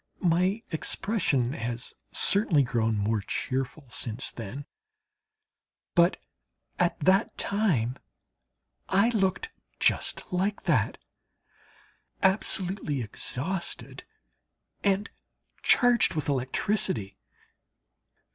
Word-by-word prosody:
My 185 Hz, +5 st, +2 dB
expression 160 Hz, -, 0 dB
has 120 Hz, 0 st, -4 dB, 0.2 s
certainly 190 Hz, -8 st, +6 dB
grown 115 Hz, -3 st, 0 dB
more 105 Hz, +1 st, 0 dB
cheerful 135 Hz, +6 st, -3 dB
since 115 Hz, +2 st, -1 dB
then, 120 Hz, +6 st, -7 dB, 1.3 s
but 170 Hz, 0 st, +4 dB, 0.6 s
at 175 Hz, -1 st, +1 dB
that 190 Hz, +7 st, +2 dB
time 150 Hz, -, 0 dB, 0.9 s
I 200 Hz, +5 st, +4 dB
looked 220 Hz, -, 0 dB, 0.3 s
just -, -, +1 dB
like 195 Hz, +3 st, -1 dB
that -, -, +1 dB, 1.3 s
absolutely 190 Hz, -, +1 dB
exhausted 165 Hz, -, -4 dB, 0.8 s
and 200 Hz, +1 st, +1 dB, 0.5 s
charged 245 Hz, -, +4 dB
with 155 Hz, -1 st, -2 dB
electricity. 130 Hz, -, -1 dB
165 Hz, 80 wpm, -27 LUFS, 125-195 Hz, 1.3 s, certainly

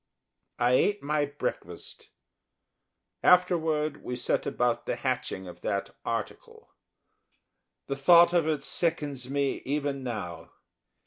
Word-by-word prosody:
I 120 Hz, +1 st, +2 dB
ate 205 Hz, +10 st, +2 dB
my 150 Hz, 0 st, +1 dB
breakfast. 145 Hz, +1 st, -6 dB, 1.1 s
Afterward, 160 Hz, -5 st, +3 dB
we 125 Hz, -, -4 dB
set 120 Hz, -, 0 dB
about 120 Hz, -1 st, 0 dB
the -, -, 0 dB
hatching 95 Hz, 0 st, -3 dB
of 90 Hz, -, -11 dB
that 100 Hz, 0 st, -3 dB
article 115 Hz, -1 st, -5 dB, 1.1 s
the 140 Hz, -, -3 dB
thought 170 Hz, +5 st, +6 dB
of 170 Hz, -3 st, +3 dB
it 155 Hz, -2 st, -1 dB
sickens 145 Hz, -7 st, -1 dB
me 140 Hz, 0 st, -1 dB
even 140 Hz, 0 st, -2 dB
now. 90 Hz, -9 st, -6 dB
140 Hz, 115 wpm, -28 LUFS, 125-160 Hz, 1.1 s, thought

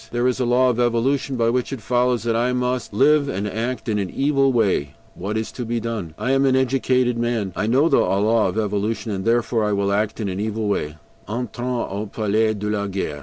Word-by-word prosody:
There 120 Hz, +1 st, 0 dB
is 130 Hz, 0 st, 0 dB
a 125 Hz, -, +1 dB
law 125 Hz, +1 st, +4 dB
of 120 Hz, -, -3 dB
evolution 130 Hz, +3 st, +1 dB
by 115 Hz, -1 st, +2 dB
which 125 Hz, +2 st, -1 dB
it 135 Hz, -, -4 dB
follows 125 Hz, +1 st, +1 dB
that 115 Hz, -1 st, 0 dB
I 120 Hz, +2 st, +1 dB
must 125 Hz, -1 st, -1 dB
live 145 Hz, +1 st, +3 dB
and 100 Hz, -1 st, -2 dB
act 115 Hz, +6 st, -3 dB
in 105 Hz, -2 st, 0 dB
an 95 Hz, -2 st, -2 dB
evil 135 Hz, +1 st, +2 dB
way; 100 Hz, -, +1 dB, 0.2 s
what 105 Hz, +4 st, -4 dB
is 110 Hz, -, -3 dB
to 125 Hz, -, -5 dB
be 120 Hz, 0 st, -2 dB
done? 110 Hz, -9 st, -5 dB
I 125 Hz, -, -1 dB
am 135 Hz, 0 st, +3 dB
an 130 Hz, -, +3 dB
educated 130 Hz, -2 st, +1 dB
man, 115 Hz, -5 st, -1 dB
I 105 Hz, -, -1 dB
know 135 Hz, +7 st, +3 dB
the -, -, +4 dB
law 105 Hz, +3 st, +2 dB
of -, -, -3 dB
evolution, 105 Hz, +1 st, -1 dB
and 95 Hz, -1 st, -3 dB
therefore 115 Hz, -1 st, +1 dB
I 105 Hz, 0 st, +1 dB
will 100 Hz, 0 st, 0 dB
act 105 Hz, +2 st, -1 dB
in 105 Hz, -, -2 dB
an 95 Hz, 0 st, -3 dB
evil 110 Hz, 0 st, -2 dB
way. 75 Hz, -7 st, -1 dB, 0.3 s
"ENTRONS 125 Hz, +1 st, -3 dB
AU 100 Hz, +2 st, -4 dB
PALAIS 110 Hz, 0 st, +1 dB
DE 105 Hz, +1 st, -4 dB
LA 100 Hz, -1 st, -1 dB
GUERRE." 95 Hz, -7 st, -3 dB
115 Hz, 230 wpm, -22 LUFS, 105-125 Hz, 0.3 s, law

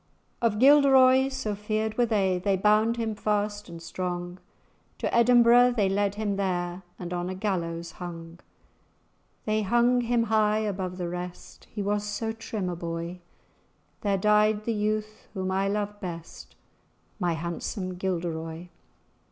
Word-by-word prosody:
"Of 225 Hz, -3 st, +1 dB
Gilderoy 265 Hz, 0 st, +6 dB
so 260 Hz, -6 st, -3 dB
feared 215 Hz, +2 st, -2 dB
they 215 Hz, -6 st, +2 dB
were, -, -, -2 dB
They 195 Hz, +1 st, +1 dB
bound 215 Hz, +4 st, +3 dB
him 225 Hz, -2 st, -1 dB
fast 205 Hz, -1 st, -2 dB
and 170 Hz, -1 st, -8 dB
strong; 175 Hz, +1 st, -5 dB, 0.6 s
To -, -, -2 dB
Edinbro' 240 Hz, +1 st, +6 dB
they 200 Hz, -4 st, +2 dB
led 200 Hz, +1 st, 0 dB
him 205 Hz, -2 st, -2 dB
there, 180 Hz, -2 st, -2 dB, 0.2 s
And 180 Hz, -1 st, -6 dB
on 175 Hz, 0 st, -2 dB
a 185 Hz, -, -4 dB
gallows 170 Hz, -4 st, -3 dB
hung. 170 Hz, -1 st, -8 dB, 1.1 s
They 215 Hz, 0 st, +1 dB
hung 240 Hz, +4 st, +3 dB
him 235 Hz, 0 st, +1 dB
high 215 Hz, -1 st, +2 dB
above 190 Hz, -3 st, -3 dB
the 180 Hz, -2 st, -3 dB
rest, 180 Hz, 0 st, -8 dB
He 210 Hz, -, -4 dB
was 205 Hz, +1 st, 0 dB
so 210 Hz, +2 st, -3 dB
trim 225 Hz, -3 st, -4 dB
a 180 Hz, -, -2 dB
boy; 170 Hz, +1 st, -5 dB, 0.8 s
There 200 Hz, -2 st, +1 dB
died 210 Hz, +1 st, +3 dB
the 230 Hz, -, 0 dB
youth 215 Hz, 0 st, -2 dB
whom 190 Hz, -1 st, -2 dB
I 195 Hz, +1 st, +1 dB
loved 205 Hz, 0 st, -2 dB
best, 170 Hz, -3 st, -8 dB, 0.6 s
My 175 Hz, -3 st, +1 dB
handsome 175 Hz, +3 st, -4 dB
Gilderoy." 170 Hz, -2 st, -4 dB
205 Hz, 145 wpm, -27 LUFS, 180-220 Hz, 1.1 s, Gilderoy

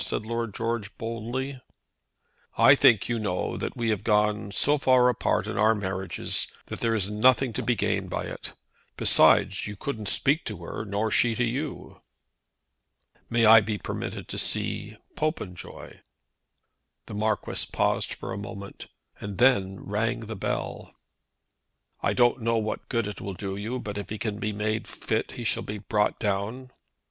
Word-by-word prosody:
said 105 Hz, -, -2 dB
Lord 115 Hz, -2 st, -3 dB
George 115 Hz, -3 st, -3 dB
boldly. 120 Hz, +4 st, -4 dB, 1.0 s
"I -, -, +8 dB
think, 110 Hz, -5 st, +5 dB
you 120 Hz, -1 st, -1 dB
know, 95 Hz, -4 st, -2 dB
that -, -, -4 dB
we 115 Hz, -1 st, 0 dB
have 105 Hz, -3 st, 0 dB
gone 105 Hz, -1 st, +2 dB
so 145 Hz, +7 st, +3 dB
far 130 Hz, -2 st, +5 dB
apart 125 Hz, -, +1 dB
in -, -, -3 dB
our 110 Hz, +1 st, +5 dB
marriages 95 Hz, -2 st, -2 dB, 0.2 s
that -, -, -7 dB
there 115 Hz, -1 st, +1 dB
is 105 Hz, -1 st, -1 dB
nothing 125 Hz, +3 st, +3 dB
to -, -, -2 dB
be 120 Hz, -, +1 dB
gained 95 Hz, -, -1 dB
by -, -, -2 dB
it. -, -, -6 dB, 0.4 s
Besides, -, -, +4 dB
you 105 Hz, -, -6 dB
couldn't 110 Hz, -4 st, -4 dB
speak 145 Hz, -, +2 dB
to -, -, -4 dB
her, -, -, -5 dB
nor 105 Hz, +2 st, -1 dB
she 115 Hz, +1 st, +3 dB
to 120 Hz, -, +1 dB
you." 135 Hz, +5 st, -4 dB, 1.3 s
"May 115 Hz, -1 st, +3 dB
I 110 Hz, 0 st, +9 dB
be 105 Hz, 0 st, -2 dB
permitted 105 Hz, -2 st, -5 dB
to -, -, -3 dB
see -, -, 0 dB, 0.2 s
Popenjoy?" 105 Hz, -, -4 dB, 1.1 s
The -, -, -9 dB
Marquis 105 Hz, 0 st, -1 dB
paused -, -, 0 dB
a 95 Hz, -, -4 dB
moment, 100 Hz, -1 st, -8 dB, 0.3 s
and 100 Hz, -1 st, -6 dB
then 100 Hz, -7 st, +3 dB
rang 110 Hz, +4 st, -1 dB
the 110 Hz, 0 st, -6 dB
bell. 95 Hz, -, -4 dB, 1.1 s
"I -, -, +1 dB
don't 120 Hz, 0 st, +3 dB
know 115 Hz, 0 st, +1 dB
what 110 Hz, -1 st, -3 dB
good 115 Hz, -3 st, 0 dB
it 105 Hz, -2 st, -6 dB
will 100 Hz, -1 st, -5 dB
do 95 Hz, 0 st, -4 dB
you, 110 Hz, +5 st, -3 dB
but 105 Hz, -4 st, -5 dB
if 100 Hz, -, -7 dB
he 110 Hz, -, -4 dB
can 105 Hz, -2 st, -3 dB
be 105 Hz, -, -1 dB
made 110 Hz, +1 st, -2 dB
fit -, -, -2 dB
he -, -, -6 dB
shall -, -, 0 dB
be 105 Hz, -, -5 dB
brought 105 Hz, +1 st, 0 dB
down." 110 Hz, +5 st, -2 dB
110 Hz, 165 wpm, -27 LUFS, 100-120 Hz, 1.3 s, I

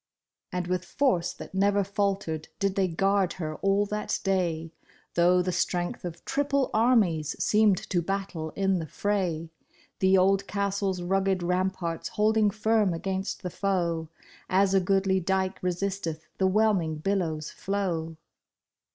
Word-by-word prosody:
And 180 Hz, -1 st, -2 dB
with 180 Hz, 0 st, -1 dB
force 180 Hz, -4 st, +1 dB
that -, -, -10 dB
never 200 Hz, +1 st, +2 dB
faltered 195 Hz, -5 st, -2 dB
did 195 Hz, -1 st, 0 dB
they 195 Hz, -1 st, +1 dB
guard 195 Hz, +2 st, +1 dB
her 155 Hz, -4 st, -5 dB
all 195 Hz, +1 st, +2 dB
that 210 Hz, +1 st, -2 dB
day, 170 Hz, -4 st, 0 dB, 0.4 s
Though 180 Hz, +1 st, +4 dB
the 185 Hz, -, -1 dB
strength 175 Hz, 0 st, -1 dB
of 170 Hz, -1 st, -7 dB
triple 280 Hz, -1 st, 0 dB
armies 205 Hz, -, +2 dB
seemed 210 Hz, -3 st, +3 dB
to 175 Hz, -, +2 dB
battle 190 Hz, -3 st, -3 dB
in 195 Hz, -2 st, +1 dB
the 160 Hz, -, -5 dB
fray, 175 Hz, -4 st, -1 dB, 0.5 s
The 190 Hz, 0 st, +4 dB
old 195 Hz, +1 st, +3 dB
castle's 200 Hz, -2 st, -1 dB
rugged 190 Hz, 0 st, +1 dB
ramparts 180 Hz, -2 st, -1 dB
holding 215 Hz, 0 st, +3 dB
firm 215 Hz, -3 st, +1 dB
against 190 Hz, +4 st, -3 dB
the 180 Hz, -, -3 dB
foe, 170 Hz, -5 st, -1 dB, 0.4 s
As 195 Hz, +1 st, +3 dB
a 195 Hz, -, +5 dB
goodly 190 Hz, 0 st, +2 dB
dike 190 Hz, +1 st, -1 dB
resisteth 180 Hz, -3 st, -2 dB
the 190 Hz, -, +4 dB
whelming 190 Hz, -5 st, +2 dB
billow's 160 Hz, -3 st, -2 dB
flow. 170 Hz, -5 st, -2 dB
190 Hz, 140 wpm, -27 LUFS, 175-200 Hz, 0.5 s, a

